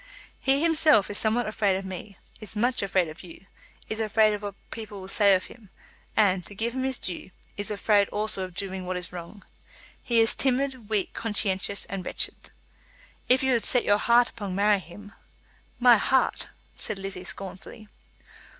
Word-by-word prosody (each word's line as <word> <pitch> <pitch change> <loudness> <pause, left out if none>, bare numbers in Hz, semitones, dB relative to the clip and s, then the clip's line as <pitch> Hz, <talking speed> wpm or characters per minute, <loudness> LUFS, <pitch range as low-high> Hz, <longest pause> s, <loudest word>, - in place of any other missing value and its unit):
"He 275 +3 +2
himself 310 -11 +4
is 205 - +2
somewhat 225 +2 +1
afraid 210 -2 +1
of 190 +1 -4
me, 190 +1 -8 0.2
is 215 0 -7
much 245 +4 +1
afraid 190 -3 +1
of 155 +1 -10
you; 180 +1 -13 0.4
is 220 - -4
afraid 215 0 +3
of 205 - -4
what 205 -1 -6 0.2
people 215 -3 -7
will 190 - -9
say 200 0 +4
of 185 - -1
him; 220 -5 -15 0.5
and, 190 -4 +3
to 200 - -11
give 230 +3 -2
him 260 - -3
his 265 -1 -1
due, 180 0 -5 0.3
is 205 - -3
afraid 205 -1 +2
also 210 -2 +1
of 185 -2 -6
doing 190 -1 -5
what 185 0 -2
is 180 0 -6
wrong. 180 +3 -9 0.6
He 235 -2 +1
is 225 0 +5
timid, 260 -3 -1
weak, 210 -3 -1
conscientious, 200 -2 +1
and 195 -2 -5
wretched. - - -2 0.8
If 255 +1 +4
you 265 -1 +2
have 235 - +1
set 245 - +3
your 205 0 +4
heart 240 +2 +4
upon 200 -5 -6
marrying 205 0 +3
him 205 +5 -13 0.3
" - - -34 0.3
"My 245 -2 +7
heart!" 265 +5 +1 0.3
said 215 - -2
Lizzie 195 -1 -6
scornfully. 195 +3 -6
205 Hz, 185 wpm, -26 LUFS, 190-230 Hz, 0.8 s, My